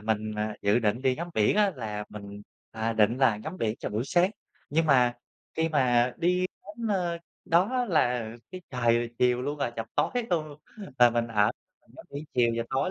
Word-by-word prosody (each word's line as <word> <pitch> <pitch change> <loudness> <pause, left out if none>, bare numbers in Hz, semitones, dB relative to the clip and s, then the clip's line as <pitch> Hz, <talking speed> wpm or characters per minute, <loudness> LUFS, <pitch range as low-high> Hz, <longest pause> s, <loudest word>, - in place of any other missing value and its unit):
mình, 110 0 -1
à, 105 0 -3
dự 100 +3 +3
định 115 +2 0
đi 130 -1 +2
ngắm 170 +2 -5
biển 110 - +3
á 205 -2 +4
là 105 -3 -4
mình, 100 -1 -9 0.3
à, 110 +1 -2
định 110 +2 +2
là 130 -5 +4
ngắm 155 - -7
biển 110 0 -1
cho - - -4
buổi 110 +3 -1
sáng. 175 +6 +3 0.4
Nhưng 160 +2 +2
mà 125 -4 +4 0.4
khi 160 0 +1
mà 125 -5 +3
đi 180 +2 +1 0.2
đến, 210 +3 -7
a, 175 -3 0 0.3
đó 215 +10 +2
là 125 - +1 0.2
cái 185 - -7
trời 120 -2 +1
chiều 125 0 +2
luôn 145 +2 -3
rồi, 130 - -1
chập 115 - -3
tối - - +2 0.2
luôn, 155 -3 -1 0.4
là 120 -1 +7
mình 120 0 0
ở 105 -2 +3 0.3
mình - - -29
ngắm - - -11
biển 145 +2 -6
chiều 120 -2 +3
và 115 - 0
tối 135 +7 0
125 Hz, 205 wpm, -27 LUFS, 110-165 Hz, 0.4 s, là